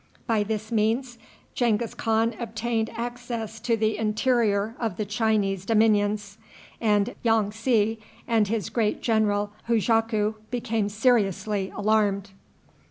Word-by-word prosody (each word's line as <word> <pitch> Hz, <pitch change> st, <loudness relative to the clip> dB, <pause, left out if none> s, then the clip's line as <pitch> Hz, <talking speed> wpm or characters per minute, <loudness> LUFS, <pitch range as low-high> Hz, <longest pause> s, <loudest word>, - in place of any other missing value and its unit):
By 225 Hz, -3 st, +1 dB
this 215 Hz, +1 st, -3 dB
means 230 Hz, +3 st, 0 dB, 0.3 s
Genghis 235 Hz, -2 st, 0 dB
Khan 225 Hz, +1 st, +1 dB
obtained 225 Hz, 0 st, -2 dB
access 235 Hz, -2 st, -5 dB
to 230 Hz, 0 st, 0 dB
the 215 Hz, -1 st, 0 dB
interior 220 Hz, -1 st, +1 dB
of 225 Hz, -6 st, -2 dB
the 215 Hz, -, -2 dB
Chinese 210 Hz, -3 st, 0 dB
dominions, 210 Hz, -1 st, +1 dB, 0.4 s
and 210 Hz, -3 st, +2 dB
Yong 225 Hz, -3 st, +2 dB
tsi 225 Hz, -1 st, +1 dB, 0.3 s
and 225 Hz, -4 st, +2 dB
his 215 Hz, -4 st, -2 dB
great 220 Hz, -3 st, 0 dB
general 210 Hz, -3 st, +1 dB, 0.2 s
Hujaku 225 Hz, -1 st, +2 dB, 0.2 s
became 225 Hz, -4 st, -1 dB
seriously 210 Hz, -3 st, +1 dB
alarmed. 205 Hz, -2 st, +1 dB
220 Hz, 115 wpm, -25 LUFS, 210-230 Hz, 0.4 s, and